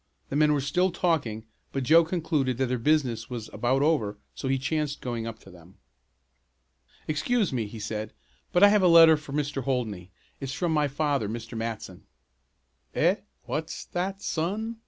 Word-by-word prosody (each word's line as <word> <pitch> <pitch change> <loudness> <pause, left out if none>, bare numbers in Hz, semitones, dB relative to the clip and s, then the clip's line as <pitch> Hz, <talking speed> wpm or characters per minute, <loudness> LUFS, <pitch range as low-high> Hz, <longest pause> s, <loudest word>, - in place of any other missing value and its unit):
The - - -3
men 150 +1 +4
were 145 -2 +2
still 180 +7 +1
talking, 140 -13 -1 0.3
but 135 - -2
Joe 165 +6 +6
concluded 160 -7 -1
that 130 - +1
their 125 0 -1
business 125 -4 +1
was 120 -3 -6
about 130 +3 +1
over 115 -10 +1 0.2
so 135 - -5
he 135 0 +2
chanced 145 +2 -2
going 115 -2 -4
up 115 - -6
to 95 - -15
them. 90 +1 -16 1.3
"Excuse 185 - 0
me," 115 -4 -1
he 110 +2 -9
said, 110 0 -4 0.4
"but 180 - +4
I 205 - +10
have 210 0 +4
a 185 - +5
letter 165 -2 +8
for 150 -2 -9
Mr. 145 -2 -2
Holdney. 110 -9 -2 0.3
It's 135 -1 -4
from 165 +5 -1
my 150 -2 +2
father, 140 -5 -1
Mr. 115 +1 -6
Matson." 110 -5 -5 0.9
"Eh, - - +3 0.3
what's 160 +2 -4
that 190 +2 -3
son?" 210 +8 -2
140 Hz, 175 wpm, -27 LUFS, 115-160 Hz, 1.3 s, I